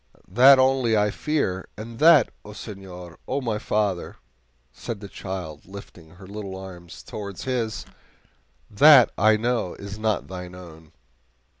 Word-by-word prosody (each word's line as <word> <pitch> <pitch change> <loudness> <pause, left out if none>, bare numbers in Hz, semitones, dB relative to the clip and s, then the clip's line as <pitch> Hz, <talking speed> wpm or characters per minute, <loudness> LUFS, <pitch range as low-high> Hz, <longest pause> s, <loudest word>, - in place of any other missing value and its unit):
That 130 +6 +7
only 130 -4 +2
I 105 0 +2
fear 100 -13 -2
and 115 +2 -9
that, 155 -5 +6
O 105 - -11
senor, 95 -5 -10
O 135 - -1
my 115 -5 -2
father," 105 -4 -2 0.6
said 115 -3 -7
the 100 - -9
child, 90 -7 -7
lifting 95 -4 -12
her 95 +1 -14
little 100 -1 -7
arms 90 -3 -11
towards 100 -3 -7
his 120 -4 -3 0.8
"that 135 +3 +7
I 110 +1 +4
know 115 -5 -1
is 100 +1 -9
not 110 -1 -1
thine 90 -1 -8
own!" 80 -4 -13
105 Hz, 140 wpm, -24 LUFS, 95-115 Hz, 0.8 s, That